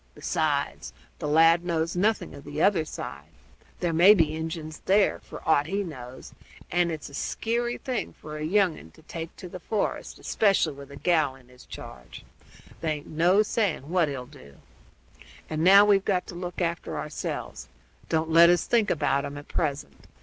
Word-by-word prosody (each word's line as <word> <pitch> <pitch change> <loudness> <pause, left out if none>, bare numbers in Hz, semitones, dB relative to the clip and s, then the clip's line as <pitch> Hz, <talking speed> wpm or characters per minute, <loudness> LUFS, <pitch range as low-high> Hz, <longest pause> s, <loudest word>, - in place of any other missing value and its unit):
Besides, - - -2 0.3
the - - -3
lad 165 +3 +5
knows 165 -1 -1
nothing 210 +5 0
of 140 - -11
the 145 +1 -6
other 175 -3 +3
side; 70 - -8 0.5
there 175 -2 0
may 180 +6 +7
be 155 -4 +2
Injuns 160 -1 -5
there, 200 +1 +3
for - - -11
aught 150 -2 +3
he 200 +4 -1
knows, 130 -7 -9 0.4
and 175 -1 +2
it's 155 -2 -6
a - - -14
skeary 240 +9 -2
thing 255 -3 -3
for 150 0 -10
a 150 - -5
young 185 0 +2
un 80 - -14
to - - -19
take 165 -1 -7
to 180 - -8
the 180 +1 -8
forest, 210 +4 -3
especially 195 -7 +1
with 140 0 -12
a 140 - -10
gal 155 -3 +1
in 125 -2 -20
his 125 0 -17
charge. - - -10 0.5
There 160 -2 -1
aint 150 -1 -7
no 175 +6 +3
saying 195 - -1
what 175 -3 +3
he'll 130 -3 -5
do. 125 - -16 0.9
And 155 0 -2
now 195 +3 +8
we've 200 -2 +4
got 185 -3 0
to - - -7
look 175 +1 -6
after 170 0 -2
ourselves; 145 - -5 0.4
don't 160 0 0
let 170 +1 +8
us 175 0 +3
think 230 -3 +2
about 140 -3 +1
'em 145 - -6
at 145 - -11
present. 145 -3 -3
165 Hz, 185 wpm, -26 LUFS, 150-185 Hz, 0.9 s, now